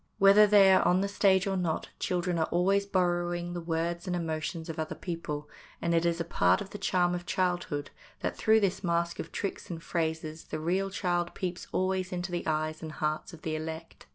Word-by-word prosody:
Whether 200 +2 +7
they 200 -2 +7
are - - +5
on 180 +1 +3
the 200 - +1
stage 195 -1 +3
or 195 -1 0
not, 175 -4 -1
children 180 -2 0
are 160 - +1
always 195 +3 +2
borrowing 175 -2 0
the 175 - -4
words 170 +2 -2
and 180 - 0
emotions 160 0 -3
of 165 -1 -5
other 155 - -3
people, 150 -4 -5 0.3
and 170 - 0
it 170 0 +3
is 170 0 0
a - - 0
part 90 - +3
of 195 - -7
the 205 - -7
charm 180 -2 +2
of 175 0 -4
childhood 175 -6 -1 0.3
that - - -2
through 220 0 +4
this 195 0 0
mask 170 -1 0
of 165 - -5
tricks 200 - -4
and 165 -2 -6
phrases 160 -1 -2
the 155 - -5
real 185 +5 0
child 175 -2 -1
peeps 180 -1 -4
always 185 0 0
into 180 0 -3
the 175 -1 -3
eyes 155 0 -1
and 160 -1 -6
hearts 155 +2 -2
of 165 -3 -13
the 155 -1 -2
elect. 160 +1 -7
175 Hz, 210 wpm, -29 LUFS, 160-185 Hz, 0.3 s, Whether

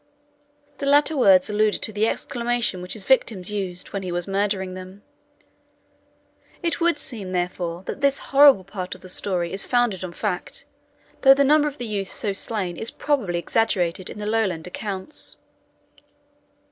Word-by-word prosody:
The 280 - -2
latter 290 +2 +4
words 195 -8 +5
allude 210 0 +2
to 215 - -2
the 210 +2 +1
exclamation 240 -5 -1
which 180 - -2
his 210 -4 -4
victims 215 -7 +2
used 185 -3 -4
when 200 - -2
he 185 -2 -5
was 175 0 -2
murdering 195 -1 -1
them. 185 +2 -10 1.6
It 335 0 -1
would 340 -2 +3
seem, 205 -10 -1
therefore, 175 -1 -3
that 275 - -6
this 280 -1 +3 0.2
horrible 275 -8 +7
part 185 -1 -6
of - - -16
the 185 - -9
story 180 -3 -1
is 195 - +3
founded 240 -7 +1
on 180 -2 -6
fact, 190 -1 -4 0.6
though 270 0 +8
the 280 - +3
number 300 +2 +4
of 290 -1 -5
the 245 - -5
youths 200 -3 -3
so 205 - -1
slain 190 -4 -3
is 225 - -2
probably 240 -13 -1
exaggerated 185 -2 0
in - - -9
the 210 - -5
Lowland 210 -7 0
accounts. 195 +7 -5
205 Hz, 165 wpm, -23 LUFS, 185-240 Hz, 1.6 s, though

